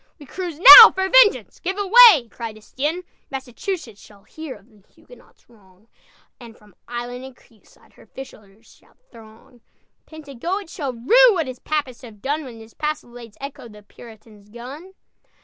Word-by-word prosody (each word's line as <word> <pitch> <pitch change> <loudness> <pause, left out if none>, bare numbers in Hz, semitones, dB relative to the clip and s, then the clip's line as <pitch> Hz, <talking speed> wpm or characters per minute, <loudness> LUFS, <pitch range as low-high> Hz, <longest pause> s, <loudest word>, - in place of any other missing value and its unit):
"We 295 - -16
cruise 345 +2 -8
now - - +11
for 380 0 -4
vengeance! - - +2
Give 375 +2 -6
away!" 410 - +5
cried 225 -2 -10
Estienne. 295 +11 -6 0.3
"Massachusetts 265 - -8
shall 200 -2 -20
hear 315 -5 -11
Of 200 0 -21
the - - -37
Huguenot's - - -23
wrong, 205 -2 -27 0.5
And 230 -2 -15
from 210 -2 -24
island 245 +1 -8
and 265 -1 -14
creekside 220 -3 -27
Her - - -22
fishers 220 -5 -15
shall - - -30
throng! 225 +1 -19 0.5
Pentagoet 315 - -8
shall 280 -6 -6
rue 460 - +3
What 335 -5 -3
his 255 -1 -10
Papists 290 -5 -5
have 225 -5 -15
done, 290 +7 -4
When 245 -4 -12
his 225 0 -17
palisades 245 -7 -8
echo 275 -3 -11
The 210 -1 -17
Puritan's 215 -1 -18
gun!" 270 - -13
255 Hz, 155 wpm, -19 LUFS, 225-315 Hz, 0.5 s, now